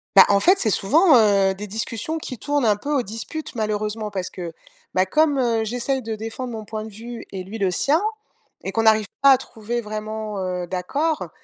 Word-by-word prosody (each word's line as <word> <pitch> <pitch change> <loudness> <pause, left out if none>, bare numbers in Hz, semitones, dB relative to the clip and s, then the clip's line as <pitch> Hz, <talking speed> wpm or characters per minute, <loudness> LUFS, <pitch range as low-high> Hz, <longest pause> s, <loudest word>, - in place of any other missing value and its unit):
Bah, 195 - +10
en 200 -1 +5
fait, 370 - +4
c'est 220 - +1
souvent, 300 - +5
heu, 200 -3 +4
des 210 +2 -6
discussions 230 +8 -3
qui 255 -5 -7
tournent 290 -1 0
un 210 - +4
peu 285 +9 -4
aux 270 - +3
disputes, 230 +8 -6
malheureusement. 215 0 -2
Parce 190 -2 -3
que, 170 -3 -7 0.4
bah, 185 0 +2
comme, 300 - +3
heu, 230 -3 +1
j'essaye 245 +3 -2
de 220 -1 -3
défendre 225 +3 -5
mon 220 -1 -6
point 215 +1 -5
de - - -8
vue 230 +3 -8
et 190 -2 -5
lui 200 +4 -7
le 195 -3 +1
sien 290 - +2 0.6
et - - -3
qu'on 225 - 0
n'arrive 220 -1 +4 0.2
pas 275 - +9
à 260 - +7
trouver 235 -1 -4
vraiment, 215 0 -5
heu, 180 -1 -3
d'accord. 280 - -1
220 Hz, 210 wpm, -22 LUFS, 205-255 Hz, 0.6 s, Bah